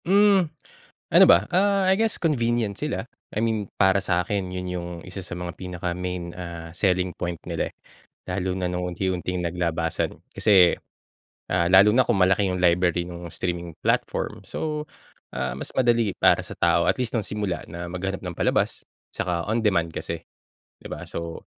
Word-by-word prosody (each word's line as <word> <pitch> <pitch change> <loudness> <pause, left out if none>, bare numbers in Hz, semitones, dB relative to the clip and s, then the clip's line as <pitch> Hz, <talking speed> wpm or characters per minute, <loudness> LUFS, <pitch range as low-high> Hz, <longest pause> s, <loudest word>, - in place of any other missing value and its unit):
Hmm. 195 -2 +5 0.6
Ano - - +9
ba, 90 +4 +7
ah, 195 +1 +3
I - - +6
guess 225 0 +1
convenient 120 - +1
sila, - - -3 0.3
I - - +1
mean 110 -3 0
para 95 +1 +4
sa'kin 95 +2 0
yun 90 0 -4
yung 90 -1 -4 0.2
isa 95 +1 -7
sa 90 - -6
mga 90 -1 -5
pinaka 90 -1 -4
main, 90 -1 -4
ah, 85 -2 -7
selling 90 -1 +1
point 85 -1 -3
nila, - - -2
eh. - - -54 0.5
Lalo 90 0 -1
na 90 - -1
nung 90 0 -2
unti-unting 90 0 -2
naglabasan 85 -1 -1 0.2
kasi, 95 -5 +6 0.8
ah, 90 -1 +2
lalo 95 +3 +8
na 130 - +6
kung 115 -5 +2
malaki 95 +1 +3
yung 90 - -1
library 85 0 +3
nung 85 -1 -8
streaming 85 -2 -4
platform. - - 0
So, 150 -1 -3 0.5
ah, 65 -1 -2
mas - - -5
madali 120 -6 +3
para - - +4
sa - - -8
tao - - +3
at - - -2
least 125 -2 -2
nung 115 - +1
simula 100 -5 -2
na 85 +2 -6
maghanap 95 +2 -3
ng 90 -2 -5
palabas - - +1 0.3
tsaka 85 -1 -2
on 115 +1 +1
demand 85 -6 +2
kasi, 85 - -4 0.6
'di - - -8
ba? - - -6
So, 85 0 -6
90 Hz, 170 wpm, -25 LUFS, 85-105 Hz, 0.8 s, Ano